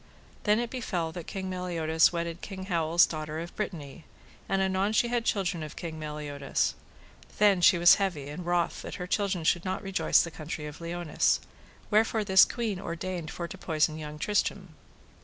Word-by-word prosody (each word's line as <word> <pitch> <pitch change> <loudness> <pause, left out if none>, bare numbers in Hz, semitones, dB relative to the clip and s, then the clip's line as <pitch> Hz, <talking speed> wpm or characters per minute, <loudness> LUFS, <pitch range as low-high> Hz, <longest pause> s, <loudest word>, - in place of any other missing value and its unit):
Then 210 0 +4
it 235 0 -2
befell 180 -10 -2
that 170 0 -8
King 190 -1 -4
Meliodas 170 -3 +2
wedded 170 0 -4
King 190 -2 -7
Howell's 170 -2 +3
daughter 155 -1 -5
of 170 +1 -7
Brittany, 165 -6 -5 0.5
and 195 - +1
anon 190 +2 +1
she 235 +2 +3
had 240 -1 0
children 190 -5 0
of 155 -1 -7
King 160 -2 -6
Meliodas: 150 -2 -2 0.6
then 205 -2 +5
was 175 - +4
she 185 - +6 0.2
heavy 175 -9 -2
and 155 +5 -6
wroth 175 0 0
that - - -7
her 180 - -5
children 195 -2 0
should 170 +2 +2
not 190 +2 -3
rejoice 195 -1 +3
the 170 - -6
country 155 0 -6
of 150 +2 -9
Liones, 170 -1 +1 0.5
wherefore 220 +1 +3
this 190 -2 +7
queen 220 -6 -3
ordained 170 -1 -4
for 170 +1 -5
to 190 - -10
poison 155 -2 0
young 150 -1 -7
Tristram. 195 +1 -1
175 Hz, 175 wpm, -28 LUFS, 160-195 Hz, 0.6 s, this